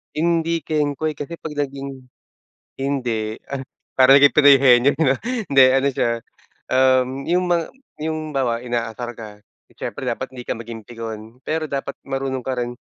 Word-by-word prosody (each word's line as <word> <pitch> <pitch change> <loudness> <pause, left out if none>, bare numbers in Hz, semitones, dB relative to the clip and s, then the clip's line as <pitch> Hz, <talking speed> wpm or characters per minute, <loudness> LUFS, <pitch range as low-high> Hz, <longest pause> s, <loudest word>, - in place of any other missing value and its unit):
Hindi 165 0 +1
kengkoy 150 0 -1
kasi 165 +4 -6
'pag 155 -2 -7
naging 135 -2 -5 0.7
hindi, 120 -6 -2 0.2
ah, 140 - -2 0.4
parang 130 +1 +8
yung 140 - +8
Penoy 145 -2 +8
Henyo 130 0 +5
'no 140 -3 +2 0.4
hindi 135 -1 +7
ano 135 +1 +2
siya, 120 - 0 0.6
um, 130 -1 +4 0.2
yung 180 +2 +2
mga 170 -2 +2 0.3
yung 155 0 -3
bawa 125 -4 -1
inaasar 120 0 -3
ka, 105 -2 -10 0.3
siyempre - - -5
dapat - - -3
hindi 125 -2 -10
ka - - -1
maging 115 -2 -9
pikon, 115 +1 -8
pero 155 0 -2
dapat 140 0 -4
marunong 135 -1 -2
ka 130 -1 -1
rin, 120 0 -4
135 Hz, 155 wpm, -21 LUFS, 120-145 Hz, 0.7 s, parang